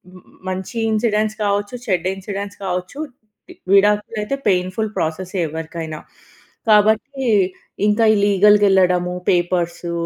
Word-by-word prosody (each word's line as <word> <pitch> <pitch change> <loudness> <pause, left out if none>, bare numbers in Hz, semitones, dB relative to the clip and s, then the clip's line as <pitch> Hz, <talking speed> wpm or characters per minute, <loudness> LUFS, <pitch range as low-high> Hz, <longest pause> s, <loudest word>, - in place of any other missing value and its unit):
మ్ 180 - -15 0.3
మంచి 190 +5 -5 0.2
ఇన్సిడెంట్స్ 215 -1 0
కావచ్చు, 205 +3 -1
చెడ్డ 180 -2 0
ఇన్సిడెంట్స్ 200 +1 -6
కావచ్చు, 180 +9 -4 0.5
వి - - -10 0.2
విడాకులైతే 210 +4 +2
పెయిన్ఫుల్ 185 +4 0
ప్రాసెసే 180 +4 -3
ఎవరికైనా. 160 0 -6 0.7
కాబట్టి, 220 +6 +3 0.6
ఇంకా 210 +2 +2
ఈ - - +2
లీగల్‌గెళ్ళడము, 190 -3 +4 0.2
పేపర్సు 175 -1 0
195 Hz, 100 wpm, -19 LUFS, 180-210 Hz, 0.7 s, లీగల్‌గెళ్ళడము